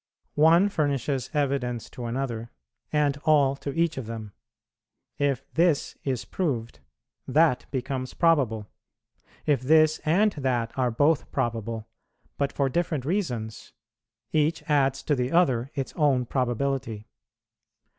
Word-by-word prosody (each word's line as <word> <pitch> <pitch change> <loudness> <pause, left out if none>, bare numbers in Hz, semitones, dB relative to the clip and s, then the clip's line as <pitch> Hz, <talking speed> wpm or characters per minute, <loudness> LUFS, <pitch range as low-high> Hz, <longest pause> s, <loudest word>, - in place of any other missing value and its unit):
One 165 +6 +5
furnishes 140 - -1
evidence 135 -6 -1
to 120 - -7
another, 115 -2 -3 0.4
and 145 -2 +2
all 145 -3 +4
to 140 - -5
each 165 -2 0
of 120 - -7
them; 110 -2 -6 0.9
if 140 -2 0
this 165 -3 +2
is 130 -4 -2
proved, 125 - -3 0.5
that 155 -4 +3
becomes 130 -1 -4
probable; 135 -11 +2 0.8
if 145 -5 +2
this 155 +3 +4
and 190 +7 +3
that 125 -7 -2
are 130 -2 +1
both 145 +3 +1
probable, 115 -1 -2 0.5
but 140 -1 +1
for 140 - 0
different 155 -1 -1
reasons, 125 - -3 0.6
each 155 +1 +1
adds 135 -2 +2
to 150 - +1
the 125 -1 -1
other 135 -8 +2
its 135 -3 -3
own 140 -5 +2
probability. 120 -3 -2
135 Hz, 125 wpm, -26 LUFS, 120-155 Hz, 0.9 s, One